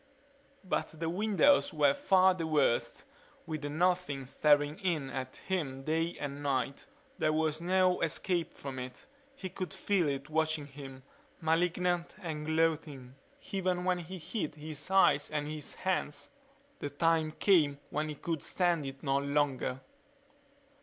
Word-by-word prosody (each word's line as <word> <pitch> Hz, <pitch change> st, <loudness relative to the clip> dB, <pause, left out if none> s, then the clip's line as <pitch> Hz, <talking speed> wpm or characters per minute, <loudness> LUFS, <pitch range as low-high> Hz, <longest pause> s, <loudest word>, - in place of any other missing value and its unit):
But 170 Hz, -4 st, -2 dB
the 165 Hz, 0 st, -1 dB
windows 215 Hz, +9 st, +4 dB
were 145 Hz, -3 st, +4 dB
far 190 Hz, +3 st, +4 dB
the 165 Hz, -3 st, -3 dB
worst, 145 Hz, -6 st, +1 dB, 0.4 s
with 155 Hz, -2 st, -4 dB
the 145 Hz, -, -3 dB
Nothing 170 Hz, -3 st, 0 dB
staring 145 Hz, +3 st, +3 dB
in 160 Hz, -8 st, -1 dB
at 130 Hz, +1 st, -5 dB
him 145 Hz, -8 st, -2 dB
day 165 Hz, +3 st, 0 dB
and 145 Hz, 0 st, -4 dB
night. 135 Hz, -1 st, -1 dB, 0.3 s
There 155 Hz, -, +3 dB
was 155 Hz, 0 st, 0 dB
no 185 Hz, +1 st, +3 dB
escape 170 Hz, +1 st, 0 dB
from 135 Hz, -2 st, -6 dB
it. 125 Hz, 0 st, -8 dB, 0.3 s
He 195 Hz, -, -5 dB
could 185 Hz, 0 st, -5 dB
feel 190 Hz, -5 st, +1 dB
it 140 Hz, 0 st, -3 dB
watching 155 Hz, -1 st, 0 dB
him, 135 Hz, -2 st, -10 dB, 0.4 s
malignant 175 Hz, +1 st, +1 dB
and 155 Hz, -5 st, -5 dB
gloating, 160 Hz, -5 st, 0 dB, 0.4 s
even 185 Hz, -2 st, 0 dB
when 180 Hz, -1 st, +1 dB
he 175 Hz, +2 st, -7 dB
hid 170 Hz, -1 st, -4 dB
his 155 Hz, +1 st, -5 dB
eyes 190 Hz, -6 st, +4 dB
in 150 Hz, -1 st, -2 dB
his 150 Hz, -1 st, -5 dB
hands. 185 Hz, -, -2 dB, 0.5 s
The 145 Hz, -, -3 dB
time 160 Hz, +1 st, +1 dB
came 155 Hz, -7 st, +3 dB
when 155 Hz, +1 st, -1 dB
he 150 Hz, -, -4 dB
could 160 Hz, +1 st, -3 dB
stand 175 Hz, -5 st, 0 dB
it 135 Hz, 0 st, -8 dB
no 135 Hz, -1 st, +2 dB
longer. 140 Hz, -2 st, 0 dB
155 Hz, 145 wpm, -32 LUFS, 145-180 Hz, 0.5 s, windows